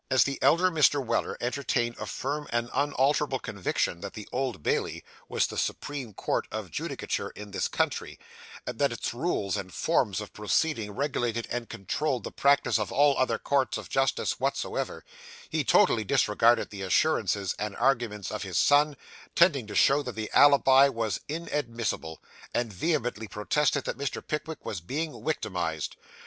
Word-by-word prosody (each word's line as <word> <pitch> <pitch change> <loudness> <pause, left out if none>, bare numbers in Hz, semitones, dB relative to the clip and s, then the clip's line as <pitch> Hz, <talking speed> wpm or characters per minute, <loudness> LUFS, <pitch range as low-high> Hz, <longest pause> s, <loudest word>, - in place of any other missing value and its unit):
As 130 -1 +5
the 140 -1 -3
elder 180 +2 +4
Mr. 150 -3 +4
Weller - - -1
entertained 120 -2 -1
a - - -5
firm 145 +3 -3
and 120 0 -1
unalterable 140 0 +1
conviction 95 -6 -2
that 100 -1 -6
the 105 - -8
Old 125 - -2
Bailey - - -1 0.3
was - - +2
the - - -4
supreme 135 -8 -4
court - - -1
of - - -5
judicature - - -3
in 105 -1 -9
this 100 - -1
country, - - -2 0.5
and - - -6
that - - +3
its - - -3
rules 100 -3 -1
and 95 -1 -5
forms 115 - +1
of 105 - -8
proceeding 110 +1 0
regulated 120 -3 -1
and 120 -2 -3
controlled 135 +5 -2
the - - -5
practice 140 -4 +3
of 105 -3 -3
all 145 +1 +4
other 130 - +1
courts 140 -2 0
of - - -8
justice 135 -3 0
whatsoever, - - -2 0.4
he - - 0
totally 110 - +4
disregarded 115 +4 +3
the 100 -2 -7
assurances 100 - +1
and 105 -1 -3
arguments 120 -6 0
of 105 - -4
his 90 -4 -3
son, 145 0 +4 0.4
tending 145 - +4
to 105 - -7
show 140 +2 +5
that 125 -6 -6
the 110 -1 -4
alibi 140 -1 +7
was 115 -5 -2
inadmissible; 120 - -3 0.4
and 115 -3 -1
vehemently 120 - -1
protested 140 +7 0
that - - -4
Mr. 140 -3 -3
Pickwick 155 +1 -4
was 95 -6 -4
being 150 - -3
'wictimised. 90 - -2
120 Hz, 160 wpm, -28 LUFS, 105-145 Hz, 0.5 s, alibi